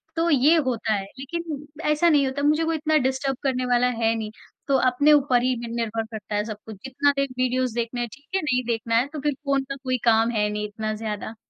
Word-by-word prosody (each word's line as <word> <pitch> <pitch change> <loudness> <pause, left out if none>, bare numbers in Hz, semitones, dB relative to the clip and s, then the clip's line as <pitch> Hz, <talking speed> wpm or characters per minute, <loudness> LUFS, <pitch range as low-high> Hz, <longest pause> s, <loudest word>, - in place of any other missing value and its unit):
तो 335 +1 +1
ये 295 +3 +5
होता 225 -3 0
है। 195 -1 -1 0.2
लेकिन 300 0 -5 0.3
ऐसा 335 +3 +3
नहीं 290 -3 +4
होता, 275 +2 -3
मुझे 305 +2 +3
कोई 325 0 0
इतना 310 0 +2
डिस्टर्ब 265 0 -2
करने 255 -2 0
वाला 245 0 +3 0.2
है 225 0 +3
नहीं। 215 -1 -4 0.4
तो 275 -1 +3
अपने 285 +4 +4
ऊपर 260 -4 +4
ही 255 0 +1
नि 235 0 -6
निर्भर 225 -1 -2
करता 215 -2 -6
है 210 - +1
सब 215 -2 -6
कुछ। 220 - -8
जितना 280 +2 +2
देर 275 0 +1
वीडियोज़ 255 -1 0
देखना 240 +1 -2
है, 240 - -1
ठीक 285 +6 -17
है। 385 - +2
नहीं 255 -4 0
देखना 230 0 -1
है, 250 +4 +2
तो 300 0 -7
फिर 295 +1 0
फ़ोन 275 -1 +1
का 275 - -3
कोई 255 -1 0
काम 225 +1 +4
है 210 -2 +1
नहीं 210 0 -3
इतना 215 +1 -4
ज़्यादा। 215 0 -5
255 Hz, 240 wpm, -24 LUFS, 225-285 Hz, 0.4 s, ये